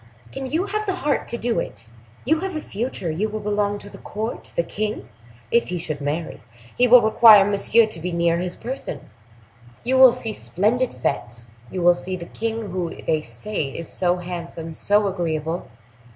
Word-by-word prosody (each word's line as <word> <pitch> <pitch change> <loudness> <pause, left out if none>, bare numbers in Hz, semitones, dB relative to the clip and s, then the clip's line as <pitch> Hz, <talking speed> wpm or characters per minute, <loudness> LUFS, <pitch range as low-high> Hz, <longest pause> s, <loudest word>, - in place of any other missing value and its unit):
"Can 270 - -5
you 320 +8 0
have 425 +1 -3
the 380 - 0
heart 295 -6 -1
to 235 - -3
do 235 0 0
it? 115 - -6 0.4
You 315 +5 +3
have 380 0 -4
a - - -1
future; 215 - -3
you 200 +8 -1
will 215 +1 -4
belong 205 0 0
to 205 - -10
the - - -12
court; 220 +3 -5
the 170 - +2
king, 215 +4 -4 0.4
if 235 - +3
he 180 - -3
should 155 -3 -4
marry, 150 +4 -3 0.4
will 250 -1 +7
require 215 -2 +8
Monsieur 205 +3 +4
to 215 -6 -7
be 180 +3 -3
near 170 0 +1
his 180 0 -3
person; 240 - -6 0.7
you 260 +2 +2
will 260 -2 +10
see 235 -3 -3
splendid 235 +9 0
fetes, 120 -1 -3 0.2
you 180 - -3
will 175 0 +7
see 180 +2 -5
the 175 -2 -7
king, 225 0 -4
who 180 -2 -3
they 155 -1 +1
say 150 - -4
is 150 +4 -6
so 180 -1 +1
handsome, 170 -2 -6
so 205 +5 +2
agreeable!" 170 -3 -2
205 Hz, 185 wpm, -22 LUFS, 170-235 Hz, 0.7 s, will